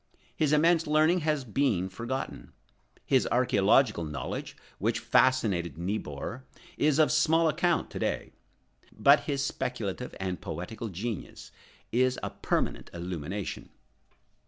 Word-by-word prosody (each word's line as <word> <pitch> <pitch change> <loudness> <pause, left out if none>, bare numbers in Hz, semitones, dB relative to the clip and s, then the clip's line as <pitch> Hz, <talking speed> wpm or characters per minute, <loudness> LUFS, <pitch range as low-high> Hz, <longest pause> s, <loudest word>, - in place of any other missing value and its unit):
His 150 -2 +1
immense 165 +2 +4
learning 155 +4 +4
has 150 -3 0
been 110 -6 +1
forgotten. 120 +8 -5 0.5
His 130 -2 +3
archæological 105 - +3
knowledge, 75 - -5 0.2
which - - +1
fascinated 95 - +2
Niebuhr, 95 - -4 0.3
is 150 -1 +2
of 155 -1 +4
small 165 +1 +4
account 170 +3 +1
to - - -5
day. - - -2 0.6
But 140 +1 +4
his 140 -2 -1
speculative 125 -3 -4
and 95 -1 -3
poetical 90 +8 -5
genius 105 +3 -6 0.4
is 130 +1 +2
a - - -3
permanent - - -2
illumination. 90 +2 -5
125 Hz, 115 wpm, -29 LUFS, 95-150 Hz, 0.6 s, immense